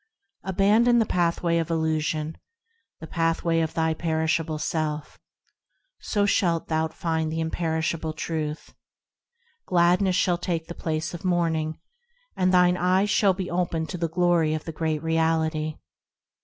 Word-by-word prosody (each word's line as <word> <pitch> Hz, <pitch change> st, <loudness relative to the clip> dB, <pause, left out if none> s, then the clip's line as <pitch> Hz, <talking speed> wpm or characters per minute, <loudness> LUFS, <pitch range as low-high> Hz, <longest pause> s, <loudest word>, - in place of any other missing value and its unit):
Abandon 210 Hz, +6 st, +3 dB
the 225 Hz, -, +3 dB
pathway 170 Hz, -2 st, +1 dB
of 165 Hz, -, -2 dB
illusion, 160 Hz, -1 st, -1 dB, 0.6 s
The -, -, -6 dB
pathway 165 Hz, 0 st, 0 dB
of 160 Hz, -1 st, -1 dB
thy 160 Hz, -1 st, +1 dB
perishable 160 Hz, 0 st, -1 dB
self, 150 Hz, -1 st, -3 dB, 0.8 s
So 205 Hz, -2 st, 0 dB
shalt 170 Hz, -4 st, +1 dB
thou 160 Hz, 0 st, +1 dB
find 160 Hz, -1 st, -2 dB
the 160 Hz, -, -2 dB
imperishable 160 Hz, 0 st, -1 dB
Truth; 155 Hz, -1 st, -4 dB, 0.9 s
Gladness 180 Hz, +1 st, +3 dB
shall 180 Hz, -1 st, +2 dB
take 170 Hz, -2 st, -2 dB
the 170 Hz, -, -7 dB
place 160 Hz, -1 st, -3 dB
of 170 Hz, -, -7 dB
mourning, 165 Hz, -3 st, 0 dB, 0.6 s
And 185 Hz, -1 st, +2 dB
thine 180 Hz, -1 st, +4 dB
eyes 185 Hz, +3 st, +2 dB
shall 195 Hz, -3 st, +3 dB
be 185 Hz, -2 st, -4 dB
opened 170 Hz, -2 st, -1 dB
to 180 Hz, -, -5 dB
the 165 Hz, -1 st, -1 dB
glory 170 Hz, -2 st, +2 dB
of 155 Hz, -, -5 dB
the 165 Hz, -, -4 dB
Great 155 Hz, -1 st, -2 dB
Reality. 160 Hz, -1 st, 0 dB
165 Hz, 140 wpm, -25 LUFS, 160-175 Hz, 0.9 s, thine